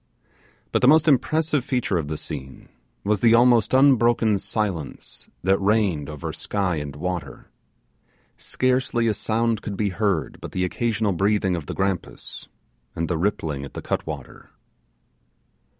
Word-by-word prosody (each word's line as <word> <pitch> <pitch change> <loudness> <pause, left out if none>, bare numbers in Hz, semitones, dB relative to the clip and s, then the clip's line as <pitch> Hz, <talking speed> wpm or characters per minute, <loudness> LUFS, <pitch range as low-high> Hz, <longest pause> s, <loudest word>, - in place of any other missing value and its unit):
But - - +1
the - - +5
most 155 +3 +6
impressive 150 +2 +2
feature 120 -8 0
of 75 - -4
the 75 0 -3
scene 70 -3 -8 0.3
was 105 0 +1
the 115 +1 +5
almost 120 -2 +4
unbroken 120 -5 +4
silence 95 -10 -4
that 95 +2 +3
reigned 100 -8 +1
over 75 -2 -5
sky 95 -5 -1
and 75 -1 -5
water. 80 -4 -5 0.8
Scarcely 130 -2 0
a 110 - +2
sound 115 +1 0
could 100 -2 -5
be 105 -2 +1
heard 95 -3 -1
but - - -8
the 90 0 0
occasional 110 +1 0
breathing 95 0 +1
of 80 -4 -6
the - - -5
grampus, 95 -2 -3 0.5
and 85 0 -2
the 85 - 0
rippling 80 -7 -1
at 70 - -10
the - - -5
cut - - -2
water. - - -8
100 Hz, 150 wpm, -23 LUFS, 85-115 Hz, 0.8 s, most